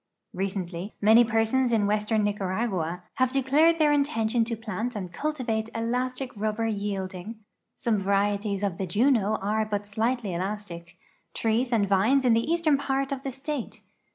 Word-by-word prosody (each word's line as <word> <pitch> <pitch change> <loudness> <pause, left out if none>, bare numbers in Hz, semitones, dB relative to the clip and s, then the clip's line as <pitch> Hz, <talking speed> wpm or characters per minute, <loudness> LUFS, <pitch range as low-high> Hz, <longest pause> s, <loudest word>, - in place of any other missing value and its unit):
Ivecently, 185 0 -4
many 220 +3 +6
persons 235 +2 +1
in 220 -3 +2
western 210 +1 +1
Niearagua 190 -4 -2 0.2
liave 255 -1 +3
declared 285 +5 +3
tiieir 300 -2 +4
intention 235 -5 +1
to 230 0 -2
plant 225 +2 -4
and 185 -4 -5
cultivate 235 -5 -2
elastic 250 +3 -2
ruhher 215 +1 -2
yielding 200 -1 -3 0.4
(some 230 -5 0
varieties 200 +1 0
of 195 -4 -2
the 190 - -2
j«no 215 +1 +2
are 215 +2 0
but 205 -1 -3
slightly 220 0 -1
elastic) 180 -2 -5 0.4
trees 230 +3 0
and 215 -4 +2
vines 220 +8 +3
in 240 - +5
the 230 +7 +1
eastern 325 -4 +2
part 275 0 -1
of 275 -1 -3
the 270 - -4
state. 270 0 -5
220 Hz, 155 wpm, -26 LUFS, 200-255 Hz, 0.4 s, many